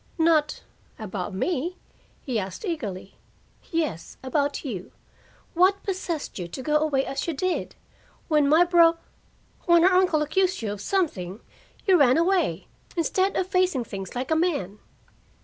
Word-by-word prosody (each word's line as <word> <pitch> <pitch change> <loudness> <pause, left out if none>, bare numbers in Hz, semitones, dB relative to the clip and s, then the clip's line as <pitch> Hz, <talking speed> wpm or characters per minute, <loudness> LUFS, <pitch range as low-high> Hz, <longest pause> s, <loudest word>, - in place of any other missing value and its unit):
"Not 320 -2 +2 0.3
about 200 -4 -5
me?" 345 - -2 0.5
he 250 -6 -1
asked 190 - -6
eagerly. 210 - -5 0.5
"Yes, 310 - -3
about 285 +3 -1
you. 195 -9 -5 0.6
What 370 +3 +3
possessed 350 - -4
you 175 - -4
to 175 - -7
go 300 +2 +2
away 295 -3 +1
as 275 +3 -3
you 330 - -2
did? 370 +5 -2 0.5
When 300 -3 +3
my 320 +4 +6
bro 340 -1 +5 0.7
when 340 -1 +6
her 375 +1 +5
uncle 360 -5 +3
accused 370 0 0
you 210 - -2
of 205 -1 -6
something, 215 - -2 0.4
you 375 -4 +5
ran 260 -1 +5
away, 360 +2 +1 0.3
instead 375 +4 +1
of 370 - +1
facing 365 -8 +1
things 195 -2 -7
like 255 +5 -3
a - - +4
man." 285 - -1
310 Hz, 150 wpm, -25 LUFS, 245-355 Hz, 0.7 s, my